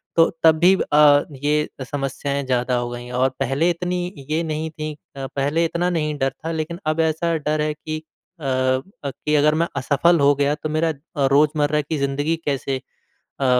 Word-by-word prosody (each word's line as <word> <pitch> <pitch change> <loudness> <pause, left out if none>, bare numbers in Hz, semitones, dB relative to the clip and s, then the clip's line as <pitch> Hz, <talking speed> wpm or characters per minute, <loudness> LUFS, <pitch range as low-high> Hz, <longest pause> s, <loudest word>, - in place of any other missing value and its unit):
तो 165 -1 +5
तब 160 -1 +6
भी 185 +3 +6 0.2
अ, 145 -1 +7 0.2
ये 150 +1 +2 0.2
समस्याएँ 140 0 -2
ज़्यादा 125 0 0
हो 120 0 -2
गई 120 0 -7
और 130 - +4
पहले 135 +6 +1
इतनी 180 +1 -1 0.2
ये 160 +2 0
नहीं 160 0 -3
थी। 155 -1 -5 0.2
अ, 135 -1 -5
पहले 145 +5 0
इतना 175 +2 0
नहीं 150 -3 -1
डर 135 0 0
था 165 - -1
लेकिन 165 +2 -3
अब 155 +1 0
ऐसा 165 +1 -1
डर 150 0 -1
है 150 0 0
कि 155 +1 -6 0.4
अ - - -12
अ, 130 0 +1 0.3
कि 150 +3 -2
अगर 150 +1 +4
मैं 170 +1 +1
असफल 145 +5 +3
हो 140 0 +5
गया 140 +1 +1
तो 155 +1 -5
मेरा 160 +1 +1
अ, 145 -1 -3
रोज़मर्रा 150 +1 +3
की 150 +2 -3
ज़िंदगी 145 +4 0
कैसे 135 -1 -1 0.7
अ - - +2
150 Hz, 190 wpm, -22 LUFS, 140-160 Hz, 0.7 s, अ